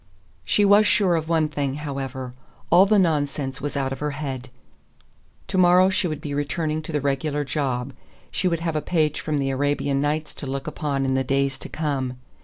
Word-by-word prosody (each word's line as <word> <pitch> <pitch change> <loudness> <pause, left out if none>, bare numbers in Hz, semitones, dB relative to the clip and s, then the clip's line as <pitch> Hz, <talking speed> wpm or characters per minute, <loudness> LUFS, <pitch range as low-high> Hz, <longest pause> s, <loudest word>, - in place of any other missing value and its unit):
She 205 - +3
was 205 +1 +6
sure 190 -4 +3
of 160 0 -2
one 160 -2 +3
thing, 140 -3 -2
however. 135 -3 -5 0.4
All 180 +4 +7
the 215 +1 +4
nonsense 145 -6 0
was 145 0 -3
out 135 -1 -1
of 135 - -7
her 150 - -1
head. 130 -4 -5 1.0
To 185 - +1
morrow 180 +1 +6
she 185 - +1
would 155 -3 -4
be 145 - -4
returning 155 +2 -1
to 155 - -7
the 150 - 0
regular 145 +2 0
job. 130 -2 -2 0.4
She 185 - 0
would 170 -2 0
have 165 -2 -2
a 155 - +1
page 155 -3 0
from 155 -2 -1
the 135 -1 0
Arabian 140 0 0
Nights 150 +1 -1
to 140 - -5
look 135 0 -3
upon 145 -3 -2
in 130 - +1
the 130 0 +1
days 135 0 0
to - - -8
come. 135 -5 -2
145 Hz, 205 wpm, -24 LUFS, 135-160 Hz, 1.0 s, All